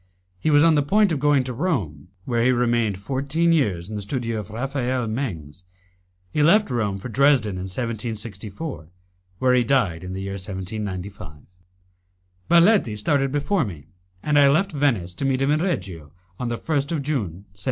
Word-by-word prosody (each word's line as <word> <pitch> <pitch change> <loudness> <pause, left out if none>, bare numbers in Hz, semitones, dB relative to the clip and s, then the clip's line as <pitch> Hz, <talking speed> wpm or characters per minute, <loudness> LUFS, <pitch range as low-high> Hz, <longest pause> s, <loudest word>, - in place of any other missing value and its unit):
He 155 - 0
was 145 0 +5
on 165 -1 +5
the 150 - +3
point 200 +7 +3
of 155 - 0
going 145 -1 +3
to 125 0 -5
Rome, 115 - -2 0.2
where 120 -2 0
he 130 - +4
remained 120 -5 +1
fourteen 140 - 0
years 100 - 0
in 110 - -6
the 105 - -3
studio 115 +1 -3
of 105 - -7
Raphael 130 +1 -2
Mengs. 95 - -5 0.7
He 150 - 0
left 185 +2 +4
Rome 105 -5 -1
for 100 - -7
Dresden 125 -2 +3
in 90 - -4
1764, 110 - -5 0.5
where 125 +4 +3
he 125 -1 +4
died 105 -10 +1
in 90 0 -6
the 95 - -5
year 100 - -4
1795. 95 -4 -6 1.1
Baletti 170 - +4
started 135 +5 +1
before 150 +5 +1
me, 85 - -8 0.3
and 150 -1 +3
I 140 -1 +6
left 175 +8 +2
Venice, 125 - 0
to 90 - -6
meet 135 -1 +1
him 135 +2 +2
in 155 +1 +2
Reggio, 90 - -3 0.3
on 125 - -2
the 120 - -2
1st 145 0 -1
of 150 -4 -2
June, 105 - -3
1750. 95 - -22
120 Hz, 180 wpm, -23 LUFS, 100-145 Hz, 1.1 s, I